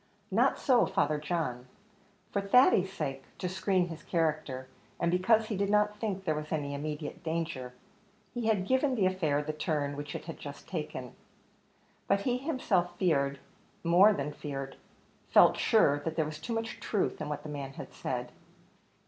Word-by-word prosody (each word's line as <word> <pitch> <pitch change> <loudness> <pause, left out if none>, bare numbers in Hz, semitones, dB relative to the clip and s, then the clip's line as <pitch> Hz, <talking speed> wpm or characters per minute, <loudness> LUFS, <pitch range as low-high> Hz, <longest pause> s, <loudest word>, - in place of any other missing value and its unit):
Not 240 +7 +3
so, 255 -4 +4
Father 150 +1 +1
John. 150 -6 -2 0.6
For 200 - 0
Thady's 200 -3 +5
sake 135 -8 -4
to 185 - -2
screen 185 -1 +1
his 165 -1 -7
character, 155 -6 -1 0.3
and 170 - +1
because 215 +5 +4
he 215 - -3
did 200 +1 0
not 210 0 +2
think 200 -4 -2
there 155 - +2
was 150 0 -5
any 145 -3 -1
immediate 150 +1 -5
danger 160 -6 -3 0.6
he 240 -2 -2
had 205 -4 +2
given 260 +1 +2
the 205 -5 +2
affair 160 -6 +1
the 155 +1 -3
turn 150 -2 -1
which 145 0 -6
it - - -6
had 165 - -7
just 145 -1 -9
taken; 150 -7 -5 0.9
but 200 0 +3
he 245 +4 +1
himself 195 - 0
feared 140 -6 +2 0.5
more 180 +5 +7
than 150 -6 -2
feared 135 -2 -5 0.5
felt - - +7
sure 145 -11 +4
that 160 +2 -4
there 160 - +1
was 155 0 -6
too 230 +9 -4
much 225 0 -3
truth 200 -6 -1
in 150 - -3
what 145 0 -4
the 155 - -7
man 140 -2 -5
had - - -9
said. - - -4
165 Hz, 175 wpm, -30 LUFS, 145-200 Hz, 0.9 s, more